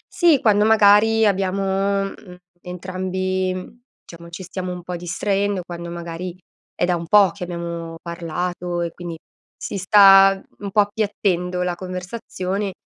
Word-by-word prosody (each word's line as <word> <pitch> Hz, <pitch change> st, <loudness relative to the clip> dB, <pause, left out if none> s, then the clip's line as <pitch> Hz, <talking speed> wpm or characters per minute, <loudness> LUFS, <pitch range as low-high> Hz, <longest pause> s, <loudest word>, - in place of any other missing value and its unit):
Sì, 335 Hz, -6 st, +4 dB
quando 210 Hz, -3 st, +4 dB
magari 220 Hz, +1 st, +5 dB
abbiamo, 195 Hz, 0 st, 0 dB
mhmm, 190 Hz, -2 st, -9 dB, 0.3 s
entrambi, 185 Hz, +3 st, -4 dB, 0.2 s
diciamo 170 Hz, 0 st, -12 dB
ci 170 Hz, +2 st, -8 dB
stiamo 185 Hz, +1 st, -5 dB
un 180 Hz, -1 st, -7 dB
po' 180 Hz, 0 st, -5 dB
distraendo, 195 Hz, +2 st, -1 dB
quando 170 Hz, -1 st, -7 dB
magari, 170 Hz, +1 st, -6 dB, 0.4 s
è -, -, +1 dB
da 180 Hz, -1 st, +1 dB
un 170 Hz, -1 st, -5 dB
po' 200 Hz, -3 st, +5 dB
che 185 Hz, -, -8 dB
abbiamo 170 Hz, -1 st, -6 dB
parlato 175 Hz, +1 st, -4 dB
e 170 Hz, -, -3 dB
quindi, 170 Hz, -2 st, -8 dB, 0.4 s
si 200 Hz, -, -5 dB
sta 195 Hz, 0 st, +7 dB, 0.2 s
un 200 Hz, -1 st, -5 dB
po' 210 Hz, +1 st, +4 dB
appiattendo 200 Hz, -4 st, -1 dB
la 180 Hz, -1 st, -1 dB
conversazione, 185 Hz, +1 st, -5 dB
185 Hz, 140 wpm, -21 LUFS, 175-200 Hz, 0.4 s, sta